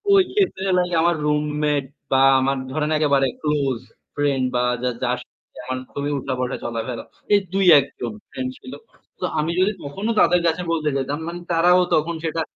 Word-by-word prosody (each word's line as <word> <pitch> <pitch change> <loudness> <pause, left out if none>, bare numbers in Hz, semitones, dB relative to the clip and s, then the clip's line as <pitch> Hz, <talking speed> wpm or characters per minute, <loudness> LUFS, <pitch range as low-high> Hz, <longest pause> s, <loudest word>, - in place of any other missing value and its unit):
ওই 390 - +7
ক্ষেত্রে 385 - +1
হলো 180 -1 +3
কি - - -6
আমার 170 0 +3
রুমমেট 150 -1 0 0.3
বা 135 0 +4 0.2
আমার 135 +1 +1
ধরেন 150 +2 -1
একেবারে 140 -3 +3
ক্লোজ 140 -5 0 0.4
ফ্রেন্ড 140 -3 +1
বা 125 - +2 0.2
যা 125 - +2
যার 125 0 +1
সাথে - - -53
যেমন 130 +1 -4 0.2
খুবই 145 +1 -2
উঠা-বসা-চলা-ফেরা। 125 -3 -3 0.3
এই 205 - +7
৩-১ 180 -7 +6
জন 120 -2 -4 0.2
ফ্রেন্ড 130 0 -3
ছিল। 130 - -10 0.5
তো - - -1
আমি 155 +2 0
যদি 190 +3 +3
তখনও 195 +11 -3
তাদের 180 0 +4
কাছে 165 +2 0
বলতে 155 -2 0
যেতাম, 140 +2 -2
মানে 170 +1 -5
তারাও 175 +2 +5
তখন 165 +2 0
সেটা 165 0 -1
150 Hz, 170 wpm, -22 LUFS, 130-170 Hz, 0.5 s, ওই